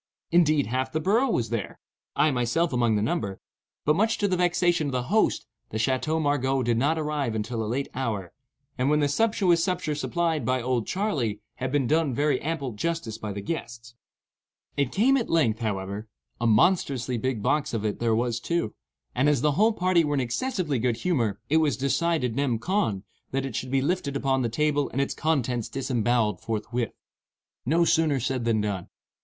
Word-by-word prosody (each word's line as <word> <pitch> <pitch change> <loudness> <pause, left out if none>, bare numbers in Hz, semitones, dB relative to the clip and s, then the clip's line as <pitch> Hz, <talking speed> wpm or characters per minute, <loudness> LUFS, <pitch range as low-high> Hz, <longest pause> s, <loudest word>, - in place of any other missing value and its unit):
Indeed, 155 -4 +4
half 130 +3 -2
the 155 - -1
borough 220 - +2
was 115 - 0
there,—I 120 +6 -2
myself 130 +6 0
among 120 -3 +2
the 105 - +1
number,—but, 120 - -3
much 220 +5 +2
to 205 - +1
the 185 - +1
vexation 175 -3 +2
of - - -2
the 125 -1 -1
host, 220 - +2 0.2
the 110 - -4
Chateau 130 +7 0
Margaux 135 -3 +1
did 115 -1 +1
not 150 +5 +2
arrive 150 -6 -1
until 110 +1 -2
a 105 - -3
late 135 +4 -1
hour, 110 -9 -3 0.5
and 130 +2 +2
when 150 0 +3
the 145 - +3
sumptuous 180 0 +2
supper 180 -5 -1
supplied 165 +1 -1
by 130 0 +1
"Old 125 -2 -1
Charley" 145 - -1 0.2
had 130 0 -3
been 145 -2 +1
done 155 -1 +1
very 145 -1 +1
ample 145 -4 -2
justice 115 -1 -3
by 105 -2 -4
the 100 0 -5
guests. 120 -5 -5 0.8
It 140 -3 0
came 260 +7 +4
at 240 - -2
length, 125 -10 +2
however,—a 105 +2 -4
monstrously 125 - +2
big 125 -3 -2
box 150 +4 +1
of 110 -2 -2
it 105 - -2
there 115 -1 +2
was, 120 0 0
too—and 145 -2 -2
as 145 -5 +2
the 150 +1 +3
whole 215 +10 +3
party 185 -4 +2
were 145 -1 0
in - - +1
excessively 145 - -1
good 120 -1 0
humor, 115 - 0
it 155 - +3
was 150 -7 +2
decided, 140 -2 0
nem. 135 -4 +1
con., 140 - -1 0.3
that 135 0 -1
it 130 -5 -5
should 130 - -3
be 135 0 +1
lifted 145 -3 -1
upon 135 -1 +1
the 120 - 0
table 145 +4 +1
and 130 - -3
its 140 - 0
contents 130 -7 -1
disembowelled 120 -6 0
forthwith. 115 +1 -3 0.7
No 170 +4 +3
sooner 160 -4 +2
said 125 -1 -2
than 110 -2 +2
done. 100 -4 -3
135 Hz, 185 wpm, -26 LUFS, 115-160 Hz, 0.8 s, Indeed